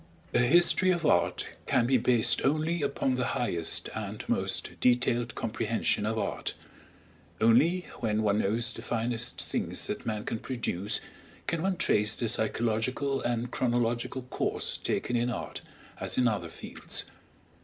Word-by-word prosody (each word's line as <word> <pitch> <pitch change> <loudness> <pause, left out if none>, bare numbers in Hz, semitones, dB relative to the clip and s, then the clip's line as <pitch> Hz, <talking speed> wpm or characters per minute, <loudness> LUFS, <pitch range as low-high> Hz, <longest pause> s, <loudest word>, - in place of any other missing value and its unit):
A - - +4
history 175 +8 +5
of 175 -3 +1
art 90 -12 +2 0.2
can 120 - +3
be 130 +1 +4
based 120 -1 +3
only 155 +4 +1
upon 140 -2 0
the 125 0 0
highest 85 -10 0
and - - -5
most - - -1
detailed 120 -1 +2
comprehension 110 -1 0
of 110 +1 -1
art; - - -2 0.8
only 150 +11 +4 0.2
when 110 -3 0
one 105 0 +2
knows 115 +4 0
the - - -8
finest 115 0 -2
things - - -2
that - - -4
man 105 -2 -3
can 110 - -2
produce 110 -5 -1 0.4
can 165 - -1
one 190 +1 0
trace 105 -9 +2
the 120 - -1
psychological 120 +5 0
and 120 0 -1
chronological 120 +1 0
course 125 - -2
taken 120 - -1
in 120 +1 +1
art, 125 - -5 0.4
as - - -2
in 125 - +4
other 110 -3 -1
fields. - - -3
120 Hz, 145 wpm, -29 LUFS, 110-130 Hz, 0.8 s, history